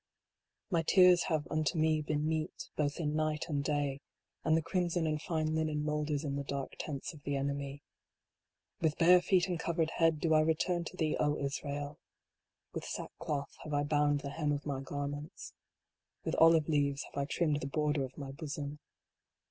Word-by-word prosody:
My 170 Hz, -2 st, +3 dB
tears 180 Hz, +1 st, +6 dB
have 155 Hz, -2 st, 0 dB
unto 155 Hz, +2 st, 0 dB
me 155 Hz, 0 st, +3 dB
been 150 Hz, 0 st, -1 dB
meat, 160 Hz, -1 st, -3 dB
both 145 Hz, +1 st, -1 dB
in 150 Hz, -2 st, -1 dB
night 155 Hz, 0 st, 0 dB
and 145 Hz, -2 st, 0 dB
day: 145 Hz, -2 st, -1 dB, 0.4 s
And 160 Hz, 0 st, +4 dB
the 165 Hz, -, 0 dB
crimson 175 Hz, -1 st, 0 dB
and 155 Hz, -1 st, -1 dB
fine 155 Hz, -2 st, -1 dB
linen 155 Hz, -1 st, 0 dB
moulders 150 Hz, -1 st, -1 dB
in 140 Hz, -2 st, -2 dB
the 140 Hz, -, -2 dB
dark 140 Hz, -1 st, -4 dB
tents 145 Hz, +1 st, -4 dB
of 150 Hz, -, -13 dB
the 145 Hz, 0 st, -2 dB
enemy. 140 Hz, 0 st, -3 dB, 1.0 s
With 160 Hz, -2 st, +1 dB
bare 180 Hz, +2 st, +7 dB
feet 180 Hz, -1 st, +3 dB
and 175 Hz, -3 st, -2 dB
covered 165 Hz, -1 st, 0 dB
head 165 Hz, -2 st, +3 dB
do 160 Hz, 0 st, +2 dB
I 155 Hz, -, +6 dB
return 170 Hz, +2 st, +1 dB
to 185 Hz, -, -8 dB
thee, 155 Hz, -3 st, +1 dB
O 150 Hz, 0 st, +2 dB
Israel! 145 Hz, +1 st, -4 dB, 0.7 s
With -, -, -4 dB
sackcloth 145 Hz, -4 st, -4 dB
have 150 Hz, -1 st, -3 dB
I 145 Hz, -, +2 dB
bound 145 Hz, -1 st, +2 dB
the 140 Hz, -, -5 dB
hem 150 Hz, 0 st, -1 dB
of 145 Hz, 0 st, -2 dB
my 140 Hz, -2 st, -2 dB
garments. 145 Hz, +2 st, -5 dB, 0.7 s
With -, -, -2 dB
olive 165 Hz, -2 st, +6 dB
leaves 145 Hz, -3 st, +1 dB
have -, -, -14 dB
I 140 Hz, -, +1 dB
trimmed 150 Hz, 0 st, 0 dB
the 135 Hz, -, -3 dB
border 150 Hz, 0 st, 0 dB
of 130 Hz, 0 st, -7 dB
my 140 Hz, -2 st, -6 dB
bosom. 145 Hz, 0 st, -5 dB
150 Hz, 185 wpm, -33 LUFS, 145-160 Hz, 1.0 s, bare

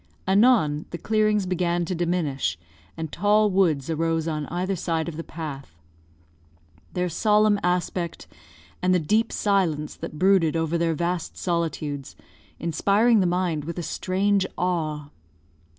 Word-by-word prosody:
Anon, 190 Hz, -8 st, +3 dB
the 170 Hz, -, -5 dB
clearings 215 Hz, 0 st, +1 dB
began 175 Hz, -1 st, 0 dB
to 185 Hz, -, -3 dB
diminish, 160 Hz, -, -1 dB, 0.4 s
and 160 Hz, -2 st, -5 dB
tall 210 Hz, +2 st, +3 dB
woods 165 Hz, -8 st, +2 dB
arose 165 Hz, 0 st, 0 dB
on 155 Hz, -3 st, -2 dB
either 185 Hz, +3 st, -2 dB
side 165 Hz, -2 st, -2 dB
of 170 Hz, -, -5 dB
the 165 Hz, -, -5 dB
path; 140 Hz, -, -8 dB, 1.2 s
their 180 Hz, 0 st, 0 dB
solemn 210 Hz, +2 st, +3 dB
aspect, 180 Hz, -1 st, -2 dB, 0.6 s
and 185 Hz, 0 st, +3 dB
the -, -, +3 dB
deep 215 Hz, +9 st, +1 dB
silence 175 Hz, -8 st, 0 dB
that 155 Hz, -, -7 dB
brooded 185 Hz, -2 st, +3 dB
over 165 Hz, 0 st, 0 dB
their 165 Hz, -1 st, +1 dB
vast 170 Hz, +1 st, -2 dB
solitudes, 160 Hz, -5 st, -3 dB, 0.4 s
inspiring 205 Hz, +7 st, +3 dB
the 185 Hz, -, +2 dB
mind 175 Hz, -4 st, 0 dB
with 170 Hz, +3 st, -6 dB
a 175 Hz, -, -3 dB
strange 195 Hz, +3 st, 0 dB
awe. 155 Hz, -5 st, -2 dB
175 Hz, 135 wpm, -24 LUFS, 160-190 Hz, 1.2 s, Anon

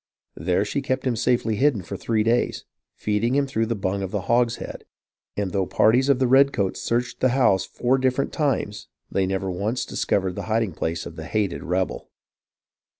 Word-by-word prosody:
There 90 Hz, +5 st, +1 dB
she 140 Hz, +7 st, -2 dB
kept 130 Hz, -1 st, -2 dB
him 125 Hz, -2 st, +1 dB
safely 115 Hz, -2 st, +1 dB
hidden 130 Hz, -7 st, +2 dB
for 100 Hz, -, -6 dB
three 110 Hz, +3 st, 0 dB
days, 115 Hz, +2 st, 0 dB, 0.3 s
feeding 110 Hz, +4 st, 0 dB
him 140 Hz, 0 st, +3 dB
through 115 Hz, -4 st, -1 dB
the 115 Hz, -, -1 dB
bung 100 Hz, -1 st, -2 dB
of 95 Hz, -, -3 dB
the 105 Hz, 0 st, -2 dB
hogshead; 120 Hz, +3 st, 0 dB, 0.5 s
and 100 Hz, -2 st, -1 dB
though 95 Hz, 0 st, 0 dB
parties 125 Hz, +5 st, +3 dB
of 140 Hz, -, +5 dB
the 130 Hz, -, +2 dB
redcoats 130 Hz, -6 st, +3 dB
searched 120 Hz, +1 st, -1 dB
the 130 Hz, -, +3 dB
house 100 Hz, -8 st, +3 dB
four 130 Hz, +2 st, +1 dB
different 130 Hz, +1 st, 0 dB
times, 110 Hz, -8 st, -1 dB, 0.2 s
they 95 Hz, -1 st, +1 dB
never 95 Hz, 0 st, -2 dB
once 105 Hz, +7 st, -2 dB
discovered 95 Hz, -2 st, 0 dB
the -, -, -5 dB
hiding 110 Hz, -2 st, +1 dB
place 80 Hz, +1 st, -3 dB
of -, -, -9 dB
the 80 Hz, -, -6 dB
hated 105 Hz, -3 st, -1 dB
rebel. 95 Hz, +2 st, -2 dB
110 Hz, 185 wpm, -24 LUFS, 95-125 Hz, 0.5 s, of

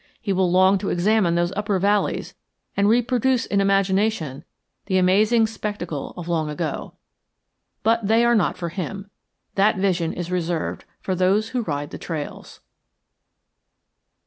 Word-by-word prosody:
He 200 Hz, -, -2 dB
will 185 Hz, -1 st, +2 dB
long 185 Hz, +2 st, +4 dB
to 195 Hz, -, -3 dB
examine 180 Hz, -1 st, +2 dB
those 175 Hz, +1 st, +1 dB
upper 205 Hz, 0 st, -1 dB
valleys 205 Hz, +2 st, 0 dB, 0.4 s
and 200 Hz, +1 st, +3 dB
reproduce 245 Hz, +2 st, +2 dB
in 200 Hz, 0 st, +1 dB
imagination 195 Hz, -6 st, +1 dB, 0.4 s
the 190 Hz, -2 st, +1 dB
amazing 210 Hz, +5 st, +4 dB
spectacle 205 Hz, -8 st, -5 dB
of 175 Hz, -1 st, -7 dB
long 160 Hz, -3 st, 0 dB
ago. 150 Hz, -, -4 dB, 0.9 s
But 225 Hz, -1 st, +2 dB
they 225 Hz, +2 st, +4 dB
are 240 Hz, -, +4 dB
not 215 Hz, -, +1 dB
for 170 Hz, -2 st, -4 dB
him. 195 Hz, +3 st, -6 dB, 0.4 s
That 205 Hz, +1 st, +3 dB
vision 180 Hz, -4 st, 0 dB
is 175 Hz, 0 st, -5 dB
reserved 175 Hz, -2 st, -2 dB, 0.2 s
for 190 Hz, -, -2 dB
those 190 Hz, +4 st, +2 dB
who 255 Hz, -1 st, -1 dB
ride 145 Hz, -7 st, -4 dB
the -, -, -7 dB
trails. 155 Hz, -4 st, -7 dB
195 Hz, 145 wpm, -23 LUFS, 175-215 Hz, 0.9 s, long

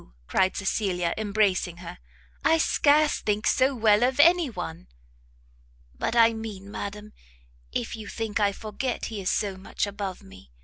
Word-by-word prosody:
cried 190 Hz, -, +1 dB
Cecilia, 185 Hz, -3 st, -1 dB
embracing 200 Hz, -4 st, 0 dB
her, 175 Hz, 0 st, -9 dB, 0.4 s
"I 325 Hz, -, +4 dB
scarce 300 Hz, -1 st, +3 dB
think 210 Hz, +1 st, -1 dB
so 265 Hz, +1 st, +3 dB
well 215 Hz, -2 st, +4 dB
of 255 Hz, +2 st, +1 dB
any 340 Hz, 0 st, +5 dB
one!" 80 Hz, -, -7 dB, 1.1 s
"But 65 Hz, -, -3 dB
I 230 Hz, -1 st, +6 dB
mean, 210 Hz, -3 st, -7 dB
madam, 210 Hz, +1 st, -6 dB, 0.6 s
if 120 Hz, -, -3 dB
you 215 Hz, -2 st, -9 dB
think 225 Hz, -1 st, -3 dB
I 205 Hz, -1 st, +3 dB
forget 215 Hz, +5 st, -4 dB
he 205 Hz, -, -4 dB
is 185 Hz, -, -1 dB
so 200 Hz, -3 st, -1 dB
much 190 Hz, -, -3 dB
above 200 Hz, -2 st, -5 dB
me. 95 Hz, -9 st, -15 dB
210 Hz, 150 wpm, -26 LUFS, 190-230 Hz, 1.1 s, I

